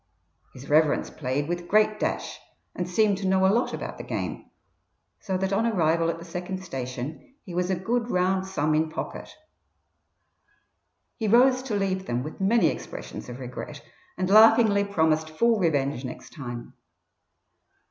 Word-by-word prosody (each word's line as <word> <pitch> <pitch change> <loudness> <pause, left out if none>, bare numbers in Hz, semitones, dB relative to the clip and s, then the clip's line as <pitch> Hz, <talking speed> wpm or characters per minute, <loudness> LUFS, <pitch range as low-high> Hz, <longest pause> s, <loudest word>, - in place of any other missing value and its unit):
His 130 +2 -11
reverence 155 0 +3
played 140 +1 -2
with 175 0 -3
great 215 +1 +3
dash, - - -2 0.3
and 180 0 -4
seemed 200 +1 +2
to 195 - -2
know 190 0 +3
a 190 - +4
lot 240 +3 +1
about - - -6
the - - -5
game, - - -5 0.7
so 190 -3 -2
that 190 +1 -1
on 225 +4 +2
arrival 165 -5 +2
at 165 - -2
the 170 - -10
second 180 +2 -5
station 135 - -6
he 180 - -9
was 180 +1 0
a 190 - +2
good 230 +6 -1
round 185 0 +1
sum 155 -5 0
in 155 +1 +1
pocket. 160 - -6 1.9
He 220 - -2
rose 255 +4 +5
to 255 -5 -3
leave 190 -1 -1
them 120 +1 -1
with 155 +6 -8
many 225 +4 +4
expressions - - -7
of 120 - -7
regret, 135 +4 -7 0.3
and 185 0 -1
laughingly 215 0 +6
promised 160 -5 +1
full 225 +8 +2
revenge 145 -6 0
next 130 - -8
time. 120 -4 -7
180 Hz, 160 wpm, -26 LUFS, 155-205 Hz, 1.9 s, laughingly